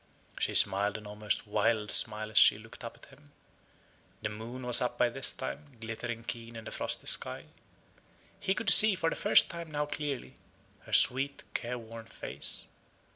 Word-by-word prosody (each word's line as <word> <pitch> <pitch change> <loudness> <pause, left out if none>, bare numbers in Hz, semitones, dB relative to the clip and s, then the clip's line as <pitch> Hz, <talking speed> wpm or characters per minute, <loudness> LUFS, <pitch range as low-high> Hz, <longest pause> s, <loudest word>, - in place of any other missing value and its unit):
She - - -2
smiled 100 +2 +4
an 105 - -13
almost 105 +2 -3
wild 105 0 -1
smile 110 -1 +1
as 110 - 0
she - - +6
looked 110 +1 -13
up 115 - -9
at - - -18
him. 145 +1 -25 0.9
The 105 - -2
moon 115 +4 -9
was 125 -1 +3
up 125 -1 -3
by 120 - +2
this 135 +3 +1
time, 145 -3 -8
glittering 115 +1 -6
keen 115 0 -8
in 115 - -9
the - - -8
frosty - - -4
sky. - - -1 1.0
He 190 - -1
could 200 +1 +2
see, 215 -2 +9
for 165 -3 -1
the - - -3
first - - +5
time 170 -1 -8
now 150 -1 -3
clearly, 145 -2 -6 0.5
her - - -12
sweet 135 +2 +2
careworn 115 -2 -6
face. 110 - -6
115 Hz, 175 wpm, -29 LUFS, 110-140 Hz, 1.0 s, see